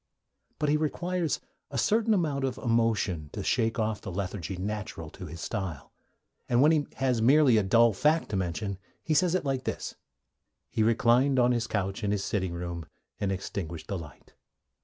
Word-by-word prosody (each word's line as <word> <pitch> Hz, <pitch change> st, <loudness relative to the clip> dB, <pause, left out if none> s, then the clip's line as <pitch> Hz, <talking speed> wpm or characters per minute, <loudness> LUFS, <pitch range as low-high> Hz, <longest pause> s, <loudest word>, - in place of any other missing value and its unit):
But 150 Hz, -, 0 dB
he 150 Hz, -, +4 dB
requires 170 Hz, +2 st, -1 dB, 0.3 s
a 140 Hz, -, -5 dB
certain 220 Hz, -, +2 dB
amount 150 Hz, -7 st, 0 dB
of 130 Hz, -1 st, -1 dB
emotion 115 Hz, -, +1 dB
to 100 Hz, -, -4 dB
shake 115 Hz, 0 st, +1 dB
off 110 Hz, -2 st, -1 dB
the 95 Hz, -, -6 dB
lethargy 95 Hz, -1 st, -4 dB
natural 95 Hz, -5 st, -4 dB
to 90 Hz, -2 st, -9 dB
his 85 Hz, +2 st, -8 dB
style, 95 Hz, -9 st, -4 dB, 0.6 s
and 120 Hz, -, +3 dB
when 150 Hz, +4 st, +6 dB
he 150 Hz, -3 st, +2 dB
has 130 Hz, -3 st, +1 dB
merely 130 Hz, 0 st, +6 dB
a -, -, +5 dB
dull 115 Hz, +3 st, +4 dB
fact 150 Hz, +10 st, +2 dB
to 105 Hz, -, -2 dB
mention 95 Hz, +1 st, -2 dB, 0.2 s
he 160 Hz, -, 0 dB
says 180 Hz, +2 st, +3 dB
it 185 Hz, -, 0 dB
like 135 Hz, -2 st, -1 dB
this: -, -, -3 dB, 0.8 s
'He -, -, 0 dB
reclined 120 Hz, +4 st, +4 dB
on 125 Hz, 0 st, +4 dB
his 120 Hz, -1 st, 0 dB
couch 100 Hz, 0 st, -2 dB
in 100 Hz, -, +1 dB
the 105 Hz, -, +2 dB
sitting 95 Hz, -2 st, -1 dB
room, 85 Hz, -2 st, -5 dB, 0.3 s
and 100 Hz, -1 st, 0 dB
extinguished 85 Hz, -3 st, -5 dB
the 100 Hz, -, -1 dB
light.' 80 Hz, -3 st, -13 dB
110 Hz, 180 wpm, -28 LUFS, 95-135 Hz, 0.8 s, when